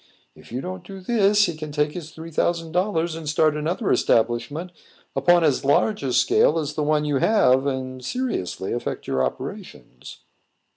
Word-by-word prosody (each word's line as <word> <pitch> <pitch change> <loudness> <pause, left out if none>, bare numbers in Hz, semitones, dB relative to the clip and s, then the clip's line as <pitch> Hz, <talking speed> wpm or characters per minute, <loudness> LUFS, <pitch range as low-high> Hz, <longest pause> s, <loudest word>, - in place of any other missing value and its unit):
If - - -17
you 125 +2 -3
don't 185 +2 -6
do 195 +1 -10
this, 205 0 +3
he 170 -4 -3
can 155 -1 -7
take 150 0 0
his 160 -1 -7
three 160 +1 -10
thousand 165 +1 -1
dollars 175 -2 0
and 160 -2 -5
start 155 0 +2
another 170 +8 -1
establishment 120 +10 +1 0.4
upon 175 -1 +4
as 145 -5 +2
large 205 +9 +2
a 135 -2 -2
scale 150 +5 +3
as 155 -2 -2
the 155 - -2
one 150 0 +1
you 145 -2 +1
have, 135 - +3
and 130 -1 -4
seriously 125 - -3
affect 120 - -4
your 65 0 0
operations." 65 - -7
155 Hz, 175 wpm, -23 LUFS, 135-180 Hz, 0.4 s, upon